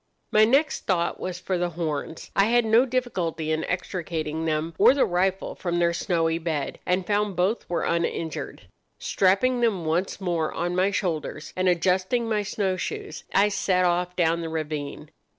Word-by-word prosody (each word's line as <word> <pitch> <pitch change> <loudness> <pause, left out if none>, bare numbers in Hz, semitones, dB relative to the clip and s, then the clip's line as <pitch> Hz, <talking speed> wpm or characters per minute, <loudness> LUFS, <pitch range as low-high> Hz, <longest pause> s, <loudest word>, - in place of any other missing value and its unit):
"My 215 0 +6
next 275 +7 +1
thought 175 -3 0
was 185 -1 -4
for 185 0 -2
the 175 0 0
horns. 160 -1 -4
I 195 - +5
had 240 +1 +3
no 230 +4 +4
difficulty 180 -11 -2
in 155 0 0
extricating 165 -3 -3
them 160 +1 -1
or 265 - +7
the 280 - +3
rifle 185 +2 0
from 175 -2 -2
their 170 0 +2
snowy 165 -2 0
bed, 160 -4 -3
and 180 0 +1
found 205 -1 0
both 185 +6 0
were 175 - -1
uninjured. 165 -2 -2 0.3
Strapping 220 +7 +2
them 205 -8 +1
once 170 +6 -1
more 170 -5 -1
on 175 +1 -1
my 185 +2 +3
shoulders, 165 -6 -3
and 185 0 +2
adjusting 185 +7 +1
my 215 -2 +1
snow 200 -2 -1
shoes, 420 - -5
I 200 +1 +4
set 190 -2 +1
off 180 0 0
down 170 -1 +2
the 165 - -4
ravine. 150 -2 -5
180 Hz, 170 wpm, -25 LUFS, 165-200 Hz, 0.3 s, or